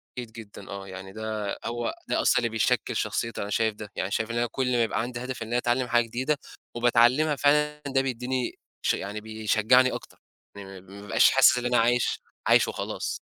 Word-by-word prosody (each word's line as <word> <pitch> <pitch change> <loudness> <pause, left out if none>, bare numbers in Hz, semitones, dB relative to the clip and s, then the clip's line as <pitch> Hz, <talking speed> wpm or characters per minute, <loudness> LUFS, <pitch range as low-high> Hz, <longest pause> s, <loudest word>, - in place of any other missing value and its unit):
أكيد 120 -2 -6
جدًا 110 -3 -11
آه 100 0 -7
يعني 95 0 -9
ده 110 -1 -4
هو 120 0 -2 0.2
ده - - +1
أصلًا - - +3
اللي 115 - +1
بيشكّل 110 -2 0
شخصيّتي 115 0 -2
أنا 100 - -4
شايف 110 +1 +1
ده، 105 -1 -9
يعني 95 +2 -3
شايف 110 +1 -1
إن 115 - -2
أنا 120 0 +1
كلّ 130 -1 -1
ما 125 - +2
بيبقى 115 0 0
عندي 120 +1 -5
هدف 125 -2 -5
إن 115 - -9
أنا 120 - 0
أتعلّم 125 +1 0
حاجة 120 -1 +3
جديدة، 130 +6 -1 0.4
وباتعلّمها 120 +5 +4
فعلًا 150 +2 +2
ده 135 -1 +2
بيديني، 125 -1 -2 0.3
ش - - +3
يعني 105 +2 -5
بيشجّعني 110 +4 +3
أكتر، - - -8 0.4
يعني 95 -2 -10
م - - -21
ما 100 +2 -12
بابقاش 105 - +4
حاسس - - +6
إن 125 - -3
أنا 125 0 +2
عايش 120 +1 +2 0.3
عايش - - +5
وخلاص. - - -4
115 Hz, 205 wpm, -26 LUFS, 105-125 Hz, 0.4 s, حاسس